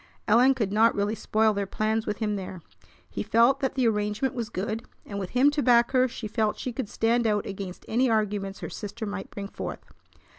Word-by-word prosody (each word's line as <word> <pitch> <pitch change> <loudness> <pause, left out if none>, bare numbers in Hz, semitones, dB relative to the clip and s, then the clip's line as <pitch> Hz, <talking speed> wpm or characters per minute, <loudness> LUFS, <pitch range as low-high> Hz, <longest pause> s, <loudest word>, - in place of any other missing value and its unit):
Ellen 245 +5 +5
could 215 -6 -1
not 225 +2 +4
really 205 +1 0
spoil 220 0 +2
their 200 -1 -2
plans 220 +2 -1
with 210 - -1
him 210 -2 -1
there. 185 -3 -6 0.4
He 95 +2 -5
felt 235 - +4
that 265 -1 -1
the 255 -3 +2
arrangement 210 +4 0
was 235 -4 -4
good, 215 +2 -3 0.2
and 200 -1 -5
with 190 -2 -4
him 280 +3 +6
to 295 0 0
back 240 -2 +4
her 255 -1 +4
she 230 -2 -6
felt 215 -1 0
she 250 - -4
could 235 -3 -4
stand 230 +1 +1
out 210 -1 +1
against 195 -2 -7
any 250 +3 +2
arguments 205 -3 -1
her - - -5
sister 215 +2 -6
might 205 -1 -5
bring 200 -1 -6
forth. - - -7
220 Hz, 215 wpm, -27 LUFS, 205-240 Hz, 0.4 s, him